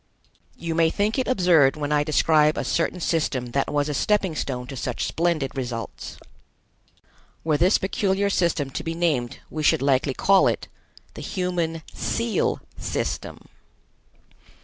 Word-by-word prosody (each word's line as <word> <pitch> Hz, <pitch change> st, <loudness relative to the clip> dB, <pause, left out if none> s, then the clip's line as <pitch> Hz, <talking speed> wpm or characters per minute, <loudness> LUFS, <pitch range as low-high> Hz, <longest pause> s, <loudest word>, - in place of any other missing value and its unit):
You 165 Hz, -1 st, -3 dB
may 165 Hz, 0 st, +3 dB
think 210 Hz, +8 st, 0 dB
it 255 Hz, -, -1 dB
absurd 175 Hz, -, +4 dB
when 150 Hz, -1 st, -3 dB
I 145 Hz, -1 st, +3 dB
describe 155 Hz, 0 st, +3 dB
a -, -, -1 dB
certain 170 Hz, +2 st, -1 dB
system 140 Hz, -8 st, -1 dB
that 140 Hz, +2 st, 0 dB
was 145 Hz, 0 st, +1 dB
a 150 Hz, -, -2 dB
stepping 195 Hz, +3 st, +1 dB
stone 125 Hz, -4 st, -3 dB
to 135 Hz, -, -8 dB
such 125 Hz, -1 st, -3 dB
splendid 160 Hz, -5 st, -1 dB
results. 120 Hz, -4 st, -5 dB, 1.3 s
Were 155 Hz, -2 st, +1 dB
this 180 Hz, +7 st, +4 dB
peculiar 195 Hz, +1 st, 0 dB
system 165 Hz, -7 st, 0 dB
to -, -, -4 dB
be 165 Hz, 0 st, -3 dB
named, 150 Hz, -9 st, 0 dB
we 155 Hz, -, -3 dB
should 145 Hz, -, +3 dB
likely 135 Hz, -1 st, +2 dB
call 195 Hz, -1 st, +4 dB
it: -, -, -1 dB, 0.5 s
"The -, -, -9 dB
Human 175 Hz, -4 st, -2 dB
Seal 230 Hz, -1 st, -1 dB, 0.2 s
System." -, -, -4 dB
160 Hz, 150 wpm, -24 LUFS, 140-180 Hz, 1.3 s, absurd